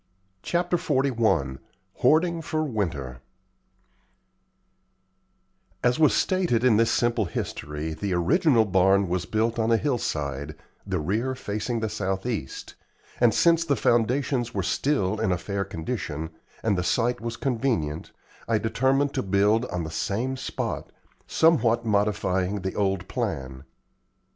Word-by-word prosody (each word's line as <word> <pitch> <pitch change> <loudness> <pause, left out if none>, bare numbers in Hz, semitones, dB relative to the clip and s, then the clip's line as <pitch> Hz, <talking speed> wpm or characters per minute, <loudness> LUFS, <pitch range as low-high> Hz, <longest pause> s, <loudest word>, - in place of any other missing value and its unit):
CHAPTER 175 0 0
XLI 110 - +1 0.4
HOARDING 165 +5 +3
FOR 155 -1 -2
WINTER 80 - -3 2.6
As 125 +4 +2
was 155 - +5
stated 175 -11 +1
early 130 - +5
in 110 - +4
this 115 0 +3
simple 120 -2 +1
history 75 -2 -4
the 100 +5 -4
original 120 - +3
barn 95 0 +3
was 90 -1 -1
built 115 +2 0
on 110 +1 +1
a 115 - +5
hillside, 75 - -2 0.3
the 95 -3 -1
rear 110 - -1
facing 110 +1 -3
the 110 - 0
southeast; 95 - -3 0.5
and 120 -2 +5
since 165 +7 +4
the 145 -4 +1
foundations 120 +2 +1
were - - 0
still 110 -8 0
in 110 -4 +1
a 90 - +1
fair 100 +3 -3
condition, 80 - -4 0.3
and 110 -3 +2
the 90 - -1
site 120 +7 0
was 115 -1 -4
convenient, 115 - -1 0.4
I 115 - +2
determined 130 +6 +1
to - - 0
build 100 +4 +2
on 90 -6 -3
the 80 - -6
same 115 +10 -2
spot, 130 - -4 0.4
somewhat 120 -8 +3
modifying 100 -2 0
the 95 +1 -3
old 95 -2 -1
plan. 70 - -4
110 Hz, 135 wpm, -25 LUFS, 90-125 Hz, 2.6 s, was